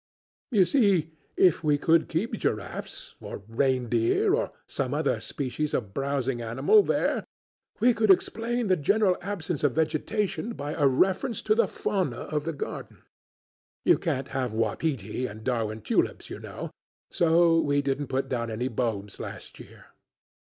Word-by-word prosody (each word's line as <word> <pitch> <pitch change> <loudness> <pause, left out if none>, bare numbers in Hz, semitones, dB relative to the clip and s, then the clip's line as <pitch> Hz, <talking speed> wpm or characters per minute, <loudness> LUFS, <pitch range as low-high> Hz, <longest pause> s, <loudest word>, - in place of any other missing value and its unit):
You 205 -8 +4
see, 190 - +2 0.3
if 180 -3 +4
we 150 -1 +3
could 160 +2 +3
keep 195 +9 -1
giraffes 105 - -4
or - - -7
reindeer 120 -1 +1
or - - 0
some 135 0 -3
other 150 -1 0
species 145 +2 -3
of 95 -2 -3
browsing 135 -1 -1
animal 120 - +4
there - - 0 0.6
we 245 +3 +5
could 220 -1 +1
explain 230 +5 +2
the 190 -2 +3
general 190 +4 +2
absence 175 -5 -4
of 145 -4 +3
vegetation 200 - -1
by 145 -6 -5
a 145 - +3
reference 190 - +1
to - - +3
the 470 +2 +3
fauna 180 - -2
of 150 -1 -3
the 165 - -1
garden: 140 - -7 0.8
'You - - +5
can't 135 +1 -2
have 130 -4 -2
wapiti 115 0 -1
and 110 0 -10
Darwin 110 -3 -1
tulips, - - -1
you - - -6
know, - - -7 0.4
so 165 0 +4
we 145 -1 +1
didn't 140 +1 -1
put 135 +1 -1
down 115 -2 -2
any 120 +4 -2
bulbs 110 -5 -3
last - - -8
year. - - -14
145 Hz, 155 wpm, -27 LUFS, 125-185 Hz, 0.8 s, we